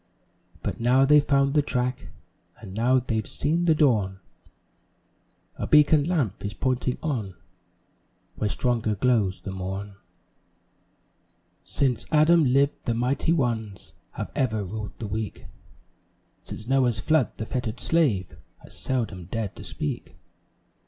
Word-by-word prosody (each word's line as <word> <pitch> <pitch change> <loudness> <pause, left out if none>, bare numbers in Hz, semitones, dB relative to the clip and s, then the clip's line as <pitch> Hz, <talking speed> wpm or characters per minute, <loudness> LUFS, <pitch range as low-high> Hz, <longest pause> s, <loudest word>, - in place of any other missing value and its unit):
But - - -3
now 125 +3 +4
they've 150 +1 +6
found 140 -1 +2
the 150 - +4
track 125 -2 -2 0.5
And 100 -5 -10
now 120 +5 +3
they've 115 -4 -1
seen 165 +4 0
the 160 -2 +4
dawn, 105 -11 +2 1.4
A - - -3
"beacon 150 -1 +5
lamp" 150 - -1
is 100 +1 -4
pointing 130 0 -1
on, 115 - -2 1.0
Where 105 - -2
stronger 115 -2 0
glows 105 -4 +1
the 95 - -6
morn. 95 +2 -5 1.7
Since 130 -5 -1
Adam 155 +1 +5
lived, 140 +3 +2
the 115 - 0
mighty 125 +7 0
ones 115 - -2 0.2
Have - - -5
ever 110 -5 0
ruled 105 +2 -6
the 110 - -5
weak; 110 +1 -5 1.0
Since 105 - -8
Noah's 125 -3 +2
flood, 155 +3 +1
the 110 - -4
fettered 125 0 -3
slave 125 - +1 0.2
Has - - -13
seldom 110 -9 -3
dared 105 +2 -4
to - - -9
speak. 75 - -5
120 Hz, 130 wpm, -25 LUFS, 105-140 Hz, 1.7 s, they've